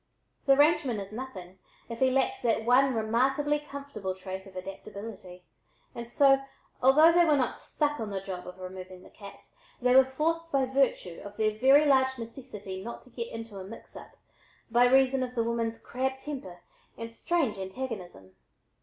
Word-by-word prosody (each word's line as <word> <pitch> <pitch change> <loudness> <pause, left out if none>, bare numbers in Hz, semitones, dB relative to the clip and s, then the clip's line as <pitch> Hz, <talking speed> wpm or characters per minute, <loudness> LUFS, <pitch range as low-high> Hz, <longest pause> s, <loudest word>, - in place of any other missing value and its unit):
The 275 0 +6
rangeman 290 -6 +3
is 195 0 -7
nothing 195 -7 -8 0.3
if 230 -1 -7
he 260 - +4
lacks 265 +1 +1
that 225 -2 +1
one 255 +2 +4
remarkably 270 +7 +1
comfortable 280 -10 -6
trait 190 +1 -7
of 190 - -15
adaptability, 195 -1 -9 0.5
and 235 0 -7
so, 270 +2 +4 0.4
although 300 +6 +7
they 345 +1 +5
were 305 -3 +4
not 255 -3 -1
"stuck 295 -1 -1
on 220 -2 -3
the 195 -1 -3
job" 185 -2 -7
of 180 0 -9
removing 185 0 -9
the - - -16
cat, 200 -2 -12 0.4
they 250 0 +3
were 265 - +9
forced 330 +5 -2
by 270 -1 +2
virtue 255 -10 0
of 205 0 -10
their 215 -1 +1
very 270 +6 +5
large 265 -2 +3
necessity 225 -5 -8
not 235 +2 -7
to 250 - -19
get 235 -1 -4
into 225 -3 -7
a - - -6
"mix 205 +5 -12
up," - - -12 0.5
by 240 +1 +5
reason 265 +1 +4
of 250 0 -4
the 230 - +1
woman's 230 -1 -2
crabbed 265 +1 -3
temper 190 -12 -7 0.3
and 230 0 -6
strange 255 - -1
antagonism. 190 - -7
235 Hz, 175 wpm, -29 LUFS, 195-270 Hz, 0.5 s, were